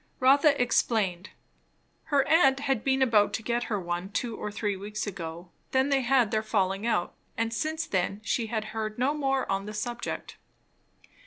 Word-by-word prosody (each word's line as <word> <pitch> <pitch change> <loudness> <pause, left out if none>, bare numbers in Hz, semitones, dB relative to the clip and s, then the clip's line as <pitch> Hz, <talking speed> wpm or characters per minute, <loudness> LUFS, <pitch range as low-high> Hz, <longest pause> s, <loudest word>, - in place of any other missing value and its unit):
Rotha 280 +3 +5
explained. 205 -6 +1 0.8
Her 285 -4 +2
aunt 275 -4 +4
had 270 -5 0
been 265 0 +2
about 215 -5 +3
to 220 - -3
get 240 +1 -1
her 210 -3 -1
one 175 +1 -3
two 225 +2 -3
or 210 - -5
three 205 -1 -2
weeks 210 +2 -5
ago; 175 -3 -7 0.2
then 265 +1 +3
they 275 -1 +3
had 265 +2 +2
had 235 -5 +3
their 215 - +1
falling 200 -1 0
out, 175 -7 0 0.2
and 230 0 -1
since 315 +5 -2
then 195 - -1
she 225 +2 -1
had 220 -1 -2
heard 215 -1 -3
no 260 +4 +1
more 270 -3 0
on 195 +1 -2
the 210 - -6
subject. 240 +3 -4
225 Hz, 180 wpm, -28 LUFS, 205-265 Hz, 0.8 s, Rotha